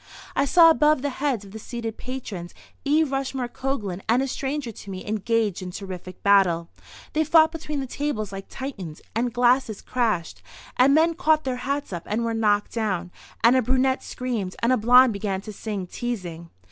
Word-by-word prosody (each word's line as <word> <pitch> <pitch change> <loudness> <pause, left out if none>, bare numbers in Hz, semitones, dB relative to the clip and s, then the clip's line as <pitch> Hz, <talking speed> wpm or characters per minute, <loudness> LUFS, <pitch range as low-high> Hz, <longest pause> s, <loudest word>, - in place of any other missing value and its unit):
I 275 - +3
saw 330 +3 +7
above 305 -3 +3
the 285 - 0
heads 260 -8 0
of 195 - -13
the 220 - -8
seated 230 0 -5
patrons 215 -9 -7 0.3
E. 300 +3 +3
Rushmore 270 -3 -2
Coglan 230 -8 -3
and 245 +4 +4
a - - -2
stranger 270 -1 -3
to 205 - -11
me 185 -1 -6
engaged 215 -1 0
in 185 - -5
terrific 185 -1 -8
battle. 185 -5 +4 0.4
They 315 - +2
fought 320 +1 +5
between 305 -3 -4
the - - -3
tables 250 -7 -3
like 195 0 -7
Titans, 195 - -7
and 240 +2 0
glasses 245 -2 +2
crashed, 195 - -1 0.3
and 270 +3 +5
men 325 +2 +4
caught 310 -1 +2
their 255 -2 -2
hats 280 -2 -3
up 170 -1 -6
and 225 +3 -1
were 230 - -1
knocked 210 -2 +1
down, 190 -6 -2 0.3
and 235 +3 +6
a 260 - +4
brunette 260 +2 +1
screamed, 230 -7 -4
and 240 +2 +4
a - - +3
blonde 250 +2 +6
began 200 -1 -2
to 215 +1 -8
sing 205 -2 -4
"Teasing." 180 -6 -5
235 Hz, 185 wpm, -24 LUFS, 200-270 Hz, 0.4 s, saw